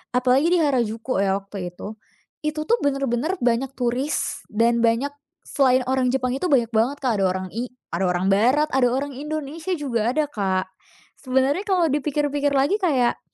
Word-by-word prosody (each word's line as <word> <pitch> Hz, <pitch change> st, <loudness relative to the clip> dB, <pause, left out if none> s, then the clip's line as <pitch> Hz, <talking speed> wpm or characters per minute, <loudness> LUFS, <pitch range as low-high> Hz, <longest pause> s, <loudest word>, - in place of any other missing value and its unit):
apalagi 255 Hz, +5 st, +3 dB
di 355 Hz, +1 st, +3 dB
Harajuku 240 Hz, -5 st, 0 dB
ya, 195 Hz, -1 st, +2 dB
waktu 195 Hz, -3 st, -7 dB
itu, 215 Hz, +4 st, -8 dB, 0.5 s
itu 305 Hz, 0 st, -2 dB
tuh 470 Hz, +8 st, +2 dB
bener-bener 275 Hz, +4 st, 0 dB
banyak 245 Hz, +2 st, +1 dB
turis 255 Hz, +4 st, -1 dB
dan 235 Hz, +2 st, +2 dB
banyak 235 Hz, +5 st, +2 dB, 0.3 s
selain 260 Hz, -3 st, +2 dB
orang 260 Hz, -1 st, +2 dB
Jepang 255 Hz, -1 st, 0 dB
itu 360 Hz, -, -1 dB
banyak 245 Hz, -7 st, +2 dB
banget, 235 Hz, +6 st, +1 dB
Kak. 230 Hz, -6 st, +1 dB
Ada 195 Hz, -, +2 dB
orang 185 Hz, 0 st, -2 dB
i 240 Hz, +3 st, -3 dB, 0.2 s
ada 180 Hz, +3 st, 0 dB
orang 180 Hz, +2 st, +1 dB
barat, 260 Hz, +10 st, +3 dB
ada 260 Hz, -2 st, +3 dB
orang 275 Hz, +3 st, -1 dB
Indonesia 310 Hz, +5 st, -4 dB
juga 245 Hz, -4 st, -1 dB
ada, 305 Hz, -1 st, +2 dB
Kak. 190 Hz, -3 st, -1 dB, 0.5 s
Sebenernya 265 Hz, +5 st, +1 dB
kalo 365 Hz, -3 st, +3 dB
dipikir-pikir 290 Hz, 0 st, 0 dB
lagi 285 Hz, +11 st, +2 dB
kayak, 265 Hz, -9 st, +2 dB
255 Hz, 165 wpm, -23 LUFS, 230-290 Hz, 0.5 s, apalagi